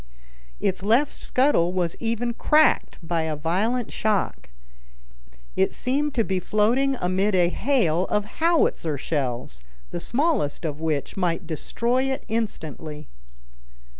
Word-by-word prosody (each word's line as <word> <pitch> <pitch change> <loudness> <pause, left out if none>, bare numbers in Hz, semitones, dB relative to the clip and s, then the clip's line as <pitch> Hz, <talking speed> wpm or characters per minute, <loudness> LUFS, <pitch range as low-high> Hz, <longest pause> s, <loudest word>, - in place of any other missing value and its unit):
Its 190 -1 0
left 230 +8 +2
scuttle 255 -10 +2
was 175 -3 0
even 235 +1 -1
cracked 305 +6 +3
by 165 0 0
a 160 -1 -2
violent 200 +11 -1
shock. 215 -2 -1 1.1
It 95 - +1
seemed 285 +3 -1
to 230 - +3
be 190 -3 -1
floating 235 +8 +2
amid 190 +3 +1
a 175 -1 +4
hail 190 - +1
of 210 +1 0 0.2
howitzer 320 - +2
shells, 125 - -3 0.3
the 175 - -3
smallest 240 - 0
of 150 -1 -3
which 155 -1 -2
might 175 -1 0
destroy 235 - 0
it 265 0 -2
instantly. 160 - -4
195 Hz, 125 wpm, -24 LUFS, 165-245 Hz, 1.1 s, a